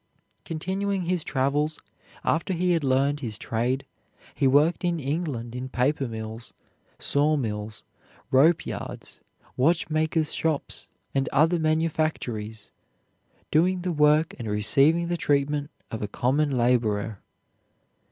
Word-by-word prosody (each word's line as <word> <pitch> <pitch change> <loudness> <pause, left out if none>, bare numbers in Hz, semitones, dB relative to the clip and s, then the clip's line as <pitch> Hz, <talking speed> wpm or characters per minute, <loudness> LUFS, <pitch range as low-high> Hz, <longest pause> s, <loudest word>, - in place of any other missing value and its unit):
Continuing 190 +4 -2
his 175 -1 0
travels, 145 +3 0 0.4
after 170 +3 0
he 180 +1 +1
had 165 -3 +1
learned 140 +2 +2
his 115 -6 -4
trade, 120 +6 -1 0.5
he 140 - +2
worked 145 +7 +3
in 175 -2 0
England 140 -5 -3
in 130 +1 -5
paper 135 +2 0
mills, 110 0 -7 0.4
saw 150 +2 +1
mills, 105 -4 -4 0.5
rope 155 +6 +4
yards, - - -7 0.3
watchmakers' 160 +1 +1
shops, 160 -3 -2 0.3
and 135 0 0
other 160 +5 +3
manufactories, 155 -9 -1 0.8
doing 180 +4 +3
the 180 - -1
work 150 +1 +3
and 115 - -5
receiving 140 +11 +3
the 175 0 -1
treatment 145 -1 0 0.2
of 110 - -4
a 105 - -2
common 140 +8 +1
laborer. 115 -5 +1
145 Hz, 120 wpm, -26 LUFS, 125-160 Hz, 0.8 s, rope